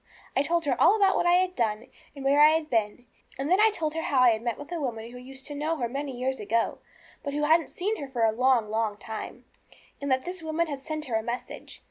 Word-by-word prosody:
I - - +4
told 335 +2 0
her 270 -3 +1
all 410 - +7
about 395 -3 +3
what - - +1
I 350 - +5
had 370 0 +1
done, 220 -1 -1 0.3
and 275 -1 -8
where 285 +2 +4
I 300 - +9
had 315 0 0
been. 225 +1 0 0.3
And 275 +5 -2
then 370 - +5
I 440 - +7
told 320 -7 -2
her 325 - -2
how 275 -5 +2
I 250 - +7
had 220 -1 -1
met 235 -1 -2
with 290 +3 -10
a 345 - -2
woman 230 -3 -4
who 250 - -10
used 265 +1 -10
to 295 - -6
know 305 +3 -1
her 240 -4 -1
many 275 +1 -5
years 260 +1 -2
ago, 225 +3 0 0.4
but 280 -1 -4
who 295 - 0
hadn't 320 +2 +4
seen 420 +5 -2
her 280 -5 -6
for 245 -3 -1
a 220 - +4
long, 240 -2 +2
long 220 -2 -1
time, 220 0 -7 0.6
and 280 - -3
that 260 0 +1
this 360 0 -5
woman 320 +1 0
had 285 -4 -5
sent 310 +2 -5
her 245 - -6
a - - -1
message. 235 +3 -6
275 Hz, 265 wpm, -27 LUFS, 240-320 Hz, 0.6 s, I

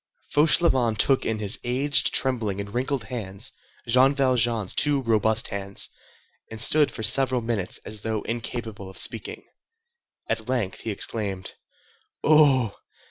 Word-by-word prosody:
Fauchelevent 145 -7 +3
took 135 +5 +2
in 110 - -1
his 105 +1 0
aged, 135 +4 +3
trembling, 115 -7 0
and 100 0 -7
wrinkled 130 0 -2
hands 105 0 -5 0.4
Jean 130 +4 +4
Valjean's 120 -6 0
two 145 -2 +1
robust 110 -1 +2
hands, 100 0 -3 0.6
and 110 - -9
stood 150 +6 +5
for 110 - -7
several 130 +3 +3
minutes 110 -5 -3
as 105 -1 -3
though 110 -1 -3
incapable 115 -3 -5
of 95 - -10
speaking. - - -1 0.8
At - - -3
length 120 -8 -2
he - - -6
exclaimed:— 100 -2 -4 0.7
"Oh! 140 -8 +4
115 Hz, 135 wpm, -24 LUFS, 105-130 Hz, 0.8 s, stood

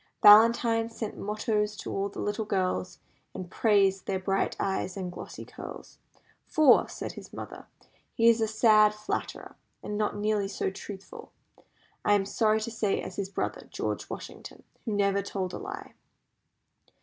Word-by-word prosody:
Valentine 225 +2 +7
sent 225 -2 -5
mottoes 210 0 -1
to - - -6
all 195 +1 -1
the - - -9
little 205 +2 -1
girls, 185 -3 -1 0.4
and 180 -1 -7
praised 195 -3 +2
their 195 - 0
bright 195 +1 0
eyes 190 -1 -2
and 185 -2 -4
glossy - - -8
curls. - - -10 0.5
"For," 305 -5 +5
said - - -5
his - - -11
mother, - - -8 0.5
"he 230 - +4
is 230 -1 +5
a 220 - +2
sad 215 -1 +5
flatterer, 210 - -5 0.3
and 210 0 -3
not 210 -1 0
nearly 210 -1 0
so 195 -1 -2
truthful, 195 0 -10 0.7
I 205 - +4
am 195 -1 +1
sorry 215 +1 +2
to 230 - -4
say, 215 -3 0
as 185 - -7
his 195 -1 -2
brother, - - -3
George - - -3
Washington, - - -9 0.2
who 220 - -2
never 200 -1 +2
told 190 -2 -4
a - - -5
lie." 400 0 -8
210 Hz, 160 wpm, -28 LUFS, 195-220 Hz, 0.7 s, Valentine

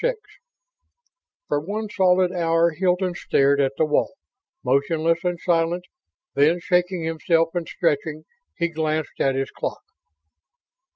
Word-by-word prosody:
VI - - +2 1.3
For 145 - +1
one 210 +8 -4
solid 185 -3 +3
hour 170 -1 +2
Hilton 180 +2 0
stared 140 -4 +2
at 135 0 +1
the 160 - +3
wall, 150 -1 0 0.5
motionless 160 +5 +1
and 175 -1 -1
silent. 170 +1 0 0.5
Then, 155 +5 +3
shaking 180 0 0
himself 165 +1 +1
and 175 -2 -3
stretching, 155 -1 -1 0.3
he 170 -1 0
glanced 155 -1 -2
at 135 -1 +2
his 135 0 -2
clock. - - -5
165 Hz, 125 wpm, -23 LUFS, 155-180 Hz, 1.3 s, solid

